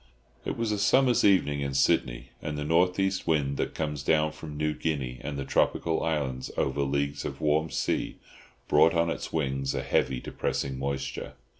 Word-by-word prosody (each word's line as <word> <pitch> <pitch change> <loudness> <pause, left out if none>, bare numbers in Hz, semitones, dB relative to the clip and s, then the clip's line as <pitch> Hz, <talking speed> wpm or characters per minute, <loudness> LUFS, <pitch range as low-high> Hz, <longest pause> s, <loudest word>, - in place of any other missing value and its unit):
It - - -3
was 115 -2 -1
a 105 - -1
summer's 125 +4 +4
evening 75 -8 +3
in 70 -1 -2
Sydney, - - +1
and 75 -1 -4
the 75 - -2
north 85 +4 +2
east 95 -2 0
wind 70 -4 +1
that - - -2
comes 75 -3 -2
down 75 +3 +2
from 75 -1 -9
New 75 0 0
Guinea 70 -6 -3
and 75 -2 -4
the 70 - -3
tropical 80 +3 +1
islands 70 -6 -2
over 70 +1 0
leagues 70 +1 -1
of - - -5
warm 75 +1 +1
sea, 65 - -1 0.5
brought 80 +1 +5
on 85 0 +2
its - - -5
wings 70 -3 -1
a - - -2
heavy 65 -2 +1
depressing 65 +1 -3
moisture. 70 0 -4
75 Hz, 180 wpm, -28 LUFS, 70-80 Hz, 0.5 s, brought